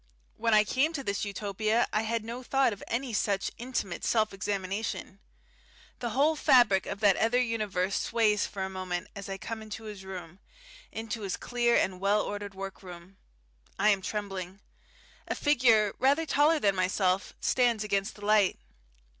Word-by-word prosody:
When 230 -1 +2
I 210 - +6
came 270 +9 +1
to 280 -4 -4
this 200 -2 -2
Utopia 215 +3 0
I 215 - +2
had 225 0 -2
no 235 +2 -5
thought 270 -1 +2
of 200 - -10
any 245 +1 -2
such 200 -2 0
intimate 240 -7 -3
self 220 -3 +1
examination. 195 0 -3 0.8
The 240 - -2
whole 285 +7 +2
fabric 235 -10 +4
of 200 +1 -5
that 200 -3 +5
other 230 +3 +2
universe 210 -6 0
sways 215 -3 +2
for 195 -2 -5
a - - -2
moment 185 -1 -4
as 200 -1 -7
I 195 - -4
come 225 +3 -6
into 220 +1 -8
his 210 -3 -8
room, 185 -2 -8 0.5
into 225 0 -5
his 195 -2 -3
clear 240 -1 +1
and 185 -1 0
ordered 205 0 0
work 195 0 -7
room. 180 0 -12 0.6
I 210 +2 +4
am 200 -2 +3
trembling. 195 -2 -5 0.7
A - - -2
figure 235 -8 +3
rather 280 +5 +3
taller 305 +2 +3
than 205 -9 +2
myself 185 +1 0
stands 240 -4 +2
against 200 0 -1
the 205 - -9
light. 210 -2 +3
210 Hz, 165 wpm, -29 LUFS, 195-230 Hz, 0.8 s, I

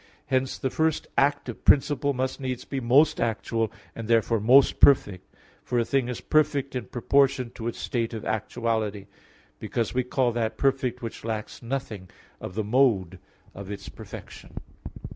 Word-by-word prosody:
Hence, 130 0 0
the 130 - -2
first 160 -1 0
active 140 -4 0
principle 140 0 +3
must 130 0 -2
needs 130 -2 -4
be 135 - -3
most 140 +6 +3
actual, 115 0 -1 0.2
and 115 -1 -6
therefore 115 0 +2
most 130 +6 +5
perfect; 105 -9 +4 0.3
for 125 - -2
a 115 - +2
thing 130 -1 0
is 125 - -5
perfect 145 -3 +1
in 125 -4 -3
proportion 130 +1 +1
to 115 -1 -6
its 120 - -4
state 115 -2 -2
of 110 - -6
actuality, 110 -2 -2 0.5
because 115 -3 -2
we 130 0 +1
call 125 0 +1
that 115 -1 -2
perfect 130 -3 0
which 115 - -6
lacks 110 -1 -5
nothing 115 -7 -5 0.3
of 90 - -8
the 110 - -1
mode 105 -6 +2 0.3
of 100 0 -9
its 100 -1 -7
perfection. - - -11
120 Hz, 160 wpm, -26 LUFS, 110-135 Hz, 0.5 s, most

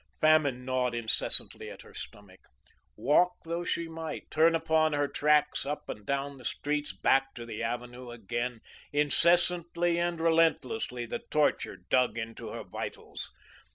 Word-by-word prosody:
Famine 145 -5 +3
gnawed 125 -2 0
incessantly 115 -2 +2
at - - -11
her - - -16
stomach; 100 -2 -11 0.6
walk 180 +5 +3
though 170 +1 -3
she 170 -1 -2
might, 160 -1 -7
turn 165 +1 +4
upon 160 -1 +2
her 145 0 +1
tracks 150 +1 +2
up 150 +1 -4
and 105 -1 -7
down 140 0 -2
the - - -13
streets, 145 +4 -2
back 135 0 +2
to 120 - -7
the 110 -2 -6
avenue 120 +2 -4
again, 120 +1 -4 0.3
incessantly 170 +3 +2
and 175 -1 -1
relentlessly 165 - +1
the 115 - -4
torture 150 -1 +1
dug 125 -2 +1
into 115 0 -6
her - - -6
vitals. - - -7
145 Hz, 145 wpm, -29 LUFS, 125-165 Hz, 0.6 s, turn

